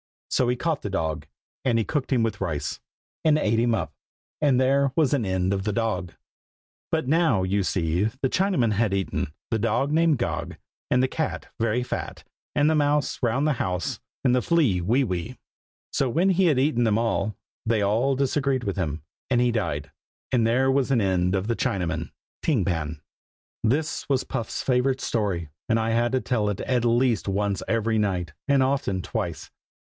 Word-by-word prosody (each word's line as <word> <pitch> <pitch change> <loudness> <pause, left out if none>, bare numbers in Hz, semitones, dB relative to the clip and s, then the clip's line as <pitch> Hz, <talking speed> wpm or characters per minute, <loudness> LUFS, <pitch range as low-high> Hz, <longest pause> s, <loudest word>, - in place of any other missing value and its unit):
So 125 - +2
he 125 - +2
caught 160 +3 -1
the 105 - -4
dog, 80 -5 -2 0.4
and 120 -3 +3
he 115 - +2
cooked 145 +4 -2
him 125 -4 +3
with 110 -3 -2
rice, 80 -6 -2 0.4
and 155 -1 +4
ate 115 -6 +1
him 120 0 +2
up. - - -3 0.5
And 140 -4 +4
there 135 +1 +3
was 150 -5 +3
an 130 -6 +1
end 95 0 0
of 95 -1 -2
the 105 0 -1
dog. 95 -7 -1 0.8
But 160 -4 0
now, 145 - +3
you 100 +2 +1
see, 90 0 0
the 130 +4 -1
Chinaman 180 - +2
had 105 -1 +1
eaten 95 -6 -2 0.2
The 115 - +1
dog, 115 +6 +1
Named 160 -1 +3
Gog, 120 - -3 0.3
And 125 +1 +3
the - - +3
cat, 160 0 -3
Very 115 +2 +1
fat, - - -5 0.3
And 145 0 +4
the 160 - +4
mouse, 145 0 +1
Round 125 +4 +1
the 155 - +3
house, 90 - -2 0.2
And 125 -2 +3
the 125 - +3
flea, 145 - +2
Wee 120 +10 +2
wee. 100 +3 -3 0.5
So 135 - +1
when 175 +10 +2
he 190 0 +3
had 155 -6 +3
eaten 130 -3 +2
them 110 -1 +3
all, 115 -2 0 0.3
they 110 -2 +2
all 115 +7 +2
disagreed 135 -1 0
with 100 -2 -3
him, 80 -4 -2 0.3
and 125 -2 +3
he 125 0 +3
died. 75 - -2 0.4
And 115 -3 +3
there 130 +3 +3
was 135 -1 +1
an 130 -4 +3
end 95 -1 +1
of 95 +2 -1
the 115 - +1
Chinaman, 90 -4 -1 0.3
Ting 130 - +1
Pan. 80 -4 -2 0.6
This 145 +8 0
was 135 -2 +2
Puff's 115 -4 -4
favorite 130 +1 +1
story, 95 -8 -1 0.2
and 115 - +3
I 110 0 0
had 120 +2 +1
to 130 - +2
tell 110 -4 0
it 100 - -3
at 125 -2 0
least 120 -2 +2
once 100 0 0
every 115 -1 +1
night, 90 -6 -1
and 140 -2 +4
often 130 -8 0
twice. - - -4
115 Hz, 190 wpm, -25 LUFS, 100-135 Hz, 0.8 s, and